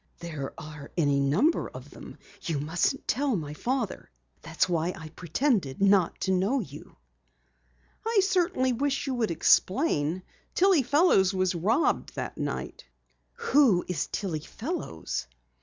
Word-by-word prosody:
"There 155 -5 -6
are 150 -2 -9
any 145 -4 +2
number 165 - +2
of - - -11
them. - - -11 0.2
You 160 -4 -2
mustn't 170 - -1
tell 270 +1 +1
my 150 -5 -4
father! 240 - -3 0.3
That's 165 +3 0
why 175 0 0
I 160 -3 -9
pretended 175 - -1
not 195 -3 +3
to 190 - 0
know 195 +9 +2
you." 150 - -9 1.1
"I 450 -1 +2
certainly 350 -9 +1
wish 275 +3 -1
you 270 - -2
would 235 -3 0
explain. 180 - +2 0.3
Tillie 375 -4 +5
Fellows 250 - +3
was 185 0 +1
robbed 205 - +1
that - - -4
night." - - -4 0.7
"Who 245 -12 +5
is 180 -5 -2
Tillie 180 -7 -3
Fellows?" 220 - -5
190 Hz, 135 wpm, -27 LUFS, -, 1.1 s, Tillie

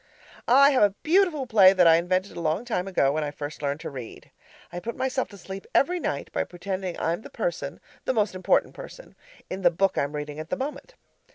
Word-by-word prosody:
I 275 +3 +7
have 265 - +2
a 205 -1 +4
beautiful 330 -4 +2
play 200 -6 +6
that 185 -2 +4
I 165 0 +7
invented 185 +3 -1
a - - -5
long 165 +8 -1
time 195 -6 -2
ago 140 -8 +2
when 155 +1 -1
I 150 - -2
first 145 +1 -7
learned 145 +1 -2
to - - -6
read. 125 -4 -10 0.4
I 175 - -4
put 230 +6 -5
myself 260 0 -1
to 200 - -13
sleep 195 +1 -9
every 355 +5 +3
night - - -3
by - - 0
pretending 185 0 -5
I'm 170 +4 -1
the - - -11
person - - -4 0.3
(the - - +1
most 210 -2 +1
important 185 0 +1
person) - - -11 0.3
in 190 - -5
the 175 - +5
book 190 +3 +1
I'm 140 +1 -2
reading 150 0 -5
at 155 +1 -7
the - - -2
moment. 295 - -6
190 Hz, 220 wpm, -26 LUFS, 165-250 Hz, 0.4 s, I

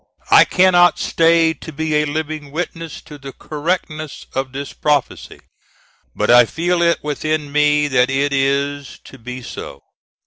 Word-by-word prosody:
I - - +8
cannot 180 -1 +4
stay 165 0 +2
to 160 - -11
be 160 +1 -3
a 150 - +1
living 155 0 -4
witness 165 0 -5
to 150 -2 -12
the 135 0 -9
correctness 155 -1 -4
of 135 0 -3
this 140 +1 -7
prophecy; 145 -3 -2 0.7
but - - +1
I 120 0 +7
feel 175 +7 -1
it 170 0 +1
within 150 0 -2
me 150 0 +2
that 130 -2 +2
it 140 +1 0
is 140 +1 -1
to 135 - -14
be 125 +2 -8
so. - - -9
150 Hz, 150 wpm, -18 LUFS, 140-160 Hz, 0.7 s, I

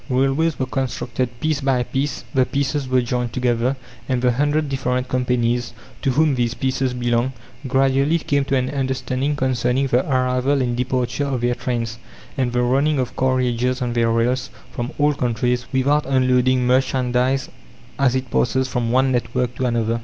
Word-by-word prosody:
Railways 135 +5 +1
were 130 - -1
constructed 130 -1 -2
piece 155 +1 0
by 135 -2 +1
piece, 135 +4 -3
the 130 -2 +4
pieces 140 +1 -2
were 130 -1 +3
joined 120 -1 -2
together, 125 +1 +1 0.3
and 130 -1 +1
the 125 0 +2
hundred 145 +4 +1
different 125 -2 -1
companies, 125 -1 0 0.3
to 135 - 0
whom 150 +3 +3
these 120 -2 0
pieces 130 -1 -1
belonged, 120 +1 0 0.3
gradually 135 +4 +2
came 140 -3 0
to 135 - 0
an 130 -1 0
understanding 130 +1 -1
concerning 130 -1 +1
the 125 -1 +2
arrival 130 +2 +1
and 120 -2 0
departure 125 +2 -1
of 130 -3 -2
their 120 0 +1
trains, 115 -2 -3 0.4
and 130 -3 0
the 125 0 +1
running 140 +5 +2
of 130 -2 -2
carriages 125 -1 +1
on 125 -2 -2
their 115 -1 +2
rails, 120 +2 0 0.2
from 120 0 -4
all 150 0 +3
countries, 125 -1 -1
without 140 +3 +2
unloading 130 -1 +2
merchandise 130 0 +1 0.5
as 130 -2 +3
it 130 -2 -3
passes 130 +1 +1
from 120 -2 -1
one 130 +1 +3
network 125 0 -1
to 130 - -1
another. 115 -1 0
130 Hz, 170 wpm, -21 LUFS, 125-135 Hz, 0.5 s, the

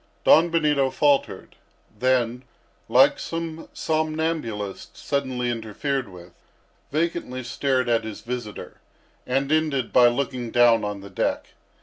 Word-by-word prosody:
Don 165 +2 +6
Benito 150 -5 +2
faltered; 145 0 0 0.4
then, 125 +1 +1 0.5
like - - +5
some 165 -1 -5
somnambulist 155 -10 -3
suddenly 130 -3 -2
interfered 120 +3 -3
with, 90 -1 -13 0.6
vacantly 155 -4 -2
stared 130 +1 0
at 115 -1 +2
his 110 -1 -7
visitor, 120 -3 -7 0.5
and 135 +3 0
ended 155 -6 0
by 125 -1 +7
looking 125 -1 -2
down 120 -1 +4
on 105 -1 -4
the 100 0 -11
deck. - - -2
130 Hz, 115 wpm, -24 LUFS, 115-150 Hz, 0.6 s, by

